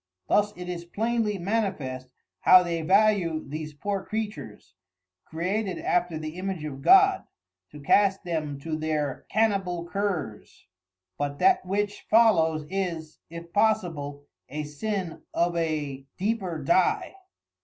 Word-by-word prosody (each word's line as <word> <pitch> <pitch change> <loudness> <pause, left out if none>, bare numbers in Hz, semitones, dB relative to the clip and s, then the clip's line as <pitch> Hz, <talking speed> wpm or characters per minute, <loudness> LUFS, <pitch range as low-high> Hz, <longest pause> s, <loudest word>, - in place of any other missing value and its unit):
Thus 210 0 +3
it 180 0 -7
is 175 -1 -4
plainly 215 +3 -1
manifest 175 - -2 0.3
how 185 0 +7
they 170 -1 -2
value 185 -2 +2
these 155 +1 -6
poor 195 +5 -3
Creatures, 205 - -6 0.5
created 185 +4 -2
after 175 -2 0
the 155 +2 -6
image 190 -4 -3
of 135 -3 -6
God, 385 - +6 0.4
to 150 - -11
cast 195 +7 +3
them 155 -5 -3
to 160 +1 -3
their 155 -3 -2
Canibal 195 -5 +1
Curs. 180 - -4 0.5
But 145 0 -2
that 375 - +3
which 205 +2 -2
follows 165 -9 +4
is 170 -4 -4
(if 170 +1 -10
possible) 165 -10 0 0.2
a 150 +3 -4
sin 180 +4 -4
of 170 0 +1
a 150 -5 -2
deeper 190 -4 -1
dye. 180 - +2
175 Hz, 125 wpm, -26 LUFS, 155-205 Hz, 0.5 s, how